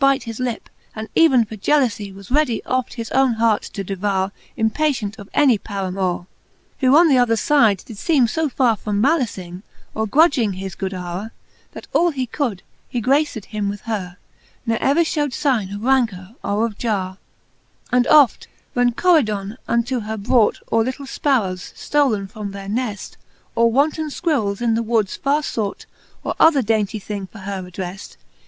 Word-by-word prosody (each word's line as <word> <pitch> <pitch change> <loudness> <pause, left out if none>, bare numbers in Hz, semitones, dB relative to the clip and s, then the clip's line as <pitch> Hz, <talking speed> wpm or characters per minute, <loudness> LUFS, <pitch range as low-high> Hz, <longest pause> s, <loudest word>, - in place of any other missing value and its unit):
And 275 0 +5
byte - - -12
his 230 -1 -7
lip, 245 -3 -3 0.3
and 220 0 -6
even 265 -8 +5
for 220 - -8
gealoufie 215 -4 +1
Was 195 +3 -13
readie 265 -6 +1
oft 255 -1 -1
his 230 -2 -6
owne 265 -2 +3
hart 225 -2 +2
to 195 - -6
devoure, 195 0 -1 0.3
Impatient 220 -2 0
of 200 - -10
any 260 -8 +4
paramoure: 190 -3 -3 0.5
Who 265 +1 +5
on 340 +1 +7
the 270 -5 +4
other 230 -2 +3
fide 225 - +3
did 215 -3 -10
feeme 295 -7 +3
fo 320 +5 -1
farre 250 -4 +2
From 205 -1 -2
malicing, 205 - 0 0.3
or 220 0 -1
grudging 275 - +3
his 190 0 -6
good 190 +1 -4
houre, 180 +3 -5 0.4
That - - -9
all 345 - +4
he 270 -5 -2
could, 235 -7 -3 0.3
he 245 - -2
graced 265 -2 +1
him 210 -2 -3
with 205 0 -5
her; 190 -6 -4 0.5
Ne 225 -1 +1
ever 280 +7 +3
Ihewed 295 -4 0
figne 220 -9 0
of 205 - -7
rancour 230 -7 +1
or 210 +3 +1
of 215 -3 -6
jarre. 195 -5 -2 0.7
XL. 250 - 0
And 250 0 +3
oft, 290 -5 +5 0.3
when 245 -1 +2
Coridon 220 - +2
unto 235 +2 0
her 220 0 -4
brought 220 +1 +2
Or 225 0 +3
litle 260 +4 -4
fparrowes, 215 -11 -1
ftolen 255 -10 +1
from 205 -1 -7
their 195 0 -7
nefl, 215 -1 -3 0.4
Or 230 0 +3
wanton 300 +5 +1
fquirrels, 255 - -1
in 230 -1 +2
the 225 - +1
woods 220 -3 0
farre 290 +2 0
fought, 215 -7 -3 0.4
Or - - -2
other 295 -5 +5
daintie 215 -1 0
thing 200 -1 -5
for 220 - -14
her 195 -1 -5
addreft. 180 +1 -7
225 Hz, 175 wpm, -21 LUFS, 200-265 Hz, 0.7 s, on